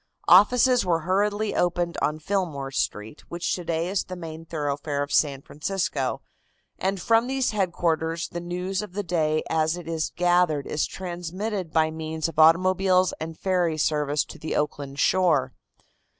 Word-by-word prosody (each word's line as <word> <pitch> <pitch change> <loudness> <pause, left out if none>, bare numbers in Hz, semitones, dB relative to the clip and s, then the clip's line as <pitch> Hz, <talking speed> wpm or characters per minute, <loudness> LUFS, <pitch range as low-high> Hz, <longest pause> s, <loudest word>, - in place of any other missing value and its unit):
Offices 245 +6 +6
were 170 -3 +1
hurriedly 205 +4 0
opened 175 -1 0
on 150 - 0
Fillmore 155 -6 -2
Street, 110 -1 -3
which 170 0 -2
today 170 -1 -2
is 195 +1 0
the 185 - -7
main 165 -2 -8
thoroughfare 145 -2 -2
of 145 - -7
San 140 -3 +2
Francisco, 150 -5 -2 0.6
and 190 +1 -1
from 230 +4 +3
these 265 -2 0
headquarters 170 -4 -1
the 175 - -6
news 180 +3 -3
of 210 -4 -9
the 205 +1 -2
day 155 -3 0
as 160 +1 +1
it 175 -2 -9
is 160 -1 -2
gathered 175 -4 +2
is 150 - -1
transmitted 185 +1 -5
by 160 -1 +2
means 160 0 -3
of 160 -1 -5
automobiles 185 +3 +4
and 160 0 -6
ferry 180 -4 0
service 150 -1 +1
to - - -12
the 160 - -4
Oakland 145 -2 -2
shore. 150 -6 +2
170 Hz, 155 wpm, -25 LUFS, 155-185 Hz, 0.6 s, Offices